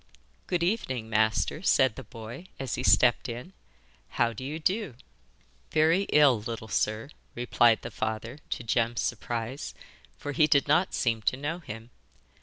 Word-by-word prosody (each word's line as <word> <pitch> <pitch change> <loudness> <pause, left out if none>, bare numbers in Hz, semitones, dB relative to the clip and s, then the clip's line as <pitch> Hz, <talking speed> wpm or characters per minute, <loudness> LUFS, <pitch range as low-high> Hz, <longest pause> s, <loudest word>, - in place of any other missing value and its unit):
'Good 175 -2 0
evening, 130 - -1
master,' 110 +8 +1
said 130 - +3
the - - -7
boy, 120 +8 -9
as 135 -4 -3
he - - -2
stepped 120 +5 +4
in. 125 +11 -7 0.6
'How 115 -1 +1
do 120 - -8
you 145 +4 -4
do?' 185 - -1 0.7
'Very 165 +5 +3
ill, 140 -7 +5
little 115 0 -5
sir, 110 +7 -1 0.2
replied 120 -1 +3
the 115 - -6
father, 110 +5 -4
to - - -3
Jem's 115 +1 +1
surprise, 120 +4 -3 0.4
for 145 - -5
he 150 +2 +4
did 140 -3 +3
not 175 +6 +2
seem 115 -3 0
to 130 - 0
know 145 +5 -3
him. 115 -5 -9
125 Hz, 155 wpm, -28 LUFS, 115-150 Hz, 0.7 s, ill